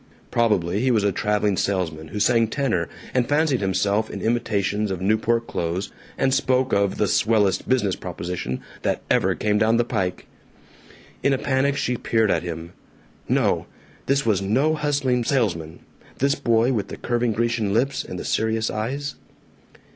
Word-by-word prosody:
Probably 105 -5 +1
he 130 +3 +1
was 110 -5 +3
a 100 - +2
traveling 105 +1 +1
salesman 85 -6 -1
who 105 - -5
sang 115 +1 +3
tenor 110 - -1 0.2
and 125 -2 +1
fancied 145 -4 +2
himself 100 +3 +1
in - - -6
imitations 105 -3 0
of 95 -2 -3
Newport 110 +4 +1
clothes 85 +1 -3 0.3
and 135 -1 +2
spoke 130 -1 +1
of 100 -1 +2
"the 105 - +2
swellest 105 -3 +2
business 105 -8 +2
proposition 85 -7 -5 0.2
that - - -1
ever - - +3
came 105 0 +1
down 110 +2 +3
the 120 - +3
pike." 90 -5 -2 1.0
In 140 - +3
a - - +2
panic 140 +1 +1
she 125 -2 -1
peered 110 -2 +1
at - - +1
him. 85 -1 -6 0.6
No! - - +1 0.4
This 135 -1 +2
was 105 -4 +2
no 130 +11 +2
hustling 140 -5 0
salesman, 95 - -1 0.4
this 140 +1 +2
boy 120 -3 +2
with 105 -4 -1
the - - -7
curving 120 -1 0
Grecian 115 -2 0
lips 130 +6 +1
and 90 - -7
the - - -6
serious 110 0 0
eyes. 135 +6 -3
110 Hz, 160 wpm, -23 LUFS, 100-130 Hz, 1.0 s, was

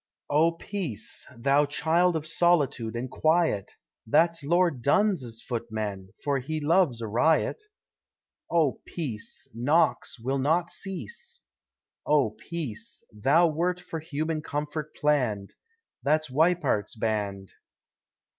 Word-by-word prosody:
Oh 160 +3 +4
Peace! 165 - -5
thou 140 +4 +3
child 165 +4 +2
of 155 -1 -2
solitude 155 -9 +2
and 120 +2 -3
quiet 155 - +1 0.3
That's 165 +6 +3
Lord 170 -3 +2
Dunn's 140 - +1
footman, 110 -5 -4
for 140 -2 +1
he 155 +5 -3
loves 150 -5 +2
a 115 - -3
riot! 155 - +2 0.9
Oh 160 -6 +2
Peace! 125 -11 -5
Knocks 140 +3 +1
will 135 +4 -1
not 165 +5 +1
cease. 190 - -6 0.6
Oh 140 -8 +3
Peace! 120 +1 -6
thou 140 +11 +4
wert 170 +3 0
for 165 - -6
human 155 0 -2
comfort 150 +1 -4
plann'd 125 -10 0 0.5
That's 155 0 +1
Weippert's 160 -8 +2
band. 105 -4 -2
150 Hz, 110 wpm, -27 LUFS, 115-165 Hz, 0.9 s, Oh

